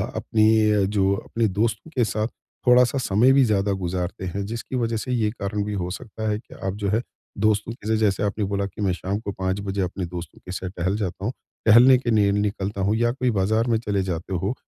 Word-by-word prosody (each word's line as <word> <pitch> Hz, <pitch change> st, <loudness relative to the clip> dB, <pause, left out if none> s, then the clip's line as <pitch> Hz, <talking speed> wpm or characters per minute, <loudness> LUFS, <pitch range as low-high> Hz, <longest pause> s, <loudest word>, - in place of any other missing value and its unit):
अपनी 110 Hz, -2 st, +3 dB
जो 100 Hz, -1 st, +2 dB
अपने 115 Hz, +3 st, -1 dB
दोस्तों 110 Hz, +8 st, -1 dB
के 125 Hz, -, +3 dB
साथ 110 Hz, +1 st, -1 dB, 0.4 s
थोड़ा-सा 125 Hz, +1 st, +5 dB
समय 120 Hz, +1 st, +3 dB
भी 135 Hz, 0 st, +5 dB
ज़्यादा 100 Hz, -2 st, +1 dB
गुजारते 90 Hz, 0 st, -3 dB
हैं, 100 Hz, +2 st, -3 dB
जिसकी 115 Hz, +4 st, -5 dB
वजह 115 Hz, -2 st, 0 dB
से 125 Hz, +4 st, -4 dB
ये 115 Hz, -4 st, +1 dB
कारण 105 Hz, -2 st, -3 dB
भी 105 Hz, -, -3 dB
हो 90 Hz, -3 st, -2 dB
सकता 110 Hz, +3 st, -6 dB
है 105 Hz, -, 0 dB
कि -, -, -16 dB
आप 95 Hz, -, -1 dB
जो 100 Hz, -1 st, -2 dB
है 110 Hz, +4 st, +1 dB, 0.4 s
दोस्तों 110 Hz, +1 st, +1 dB
के 110 Hz, -3 st, -11 dB
लिए 110 Hz, -, +3 dB
जैसे 105 Hz, -2 st, +1 dB
आपने 105 Hz, 0 st, -1 dB
बोला 100 Hz, 0 st, -1 dB
कि 100 Hz, +2 st, -8 dB
मैं 100 Hz, -2 st, +2 dB
शाम 95 Hz, +3 st, -3 dB
को 105 Hz, -2 st, -5 dB
5 95 Hz, 0 st, -2 dB
बजे 100 Hz, 0 st, -2 dB
अपने 90 Hz, 0 st, -2 dB
दोस्तों 85 Hz, -1 st, -8 dB
के 90 Hz, -, -7 dB
साथ 95 Hz, 0 st, -4 dB
टहल 95 Hz, +4 st, 0 dB
जाता 95 Hz, -2 st, -4 dB
हूँ 115 Hz, -, 0 dB, 0.3 s
टहलने 120 Hz, +4 st, +8 dB
के 125 Hz, -1 st, -2 dB
लिए 105 Hz, -2 st, +4 dB
निकलता 100 Hz, -1 st, -1 dB
हूँ 100 Hz, +3 st, +2 dB
या 120 Hz, +1 st, +2 dB
कोई 125 Hz, 0 st, 0 dB
बाजार 110 Hz, +5 st, +2 dB
में 115 Hz, -2 st, +2 dB
चले 100 Hz, -4 st, -1 dB
जाते 85 Hz, +3 st, -4 dB
हो, 95 Hz, +5 st, -1 dB
105 Hz, 230 wpm, -24 LUFS, 95-110 Hz, 0.4 s, टहलने